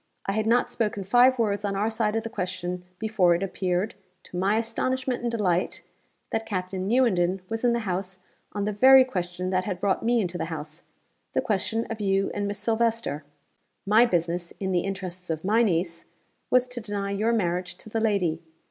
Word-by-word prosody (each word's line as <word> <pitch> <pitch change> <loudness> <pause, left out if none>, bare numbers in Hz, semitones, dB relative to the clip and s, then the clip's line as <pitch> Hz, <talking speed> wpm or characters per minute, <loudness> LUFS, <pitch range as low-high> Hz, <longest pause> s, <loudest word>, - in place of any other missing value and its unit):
I - - 0
had 215 +2 0
not 240 +2 +3
spoken 210 -3 -1
five 245 +6 +5
words 205 -3 0
on 200 -1 -1
our 210 +3 0
side 220 -1 0
of 225 - 0
the 225 - -4
question 180 -1 -4
before 205 -5 +3
it 175 - -2
appeared, 185 +1 -1 0.3
to - - -12
my 195 +4 +2
astonishment 255 +3 -1
and 240 - -1
delight, 185 -6 0 0.5
that 225 0 -2
Captain 185 -2 -3
Newenden 190 -7 +2
was 225 +1 -3
in 240 -1 +4
the 235 - 0
house 190 -2 -3 0.3
on 205 -1 -2
the 210 - 0
very 260 +5 +8
question 180 -5 -3
that 185 0 +1
had 185 -4 -3
brought 195 -1 +1
me 235 +1 +2
into 180 -4 -2
the - - -1
house 155 -1 -7 0.5
the - - +2
question 220 +2 -1
of 220 -1 -4
you 195 -1 +1
and 205 0 -2
Miss 205 0 -3
Silvester. 225 -7 0 0.6
My 220 +4 +5
business, 170 -2 -1
in 190 -1 -2
the 180 - +2
interests 185 -2 -5
of 160 +1 -3
my 220 +4 +4
niece, 170 -5 0 0.4
was 250 0 +4
to 245 -1 -5
deny 205 -2 -3
your 215 +3 +1
marriage 180 -5 -1
to 190 - -13
the 225 +1 -2
lady. 190 -7 +1
200 Hz, 195 wpm, -26 LUFS, 180-225 Hz, 0.6 s, very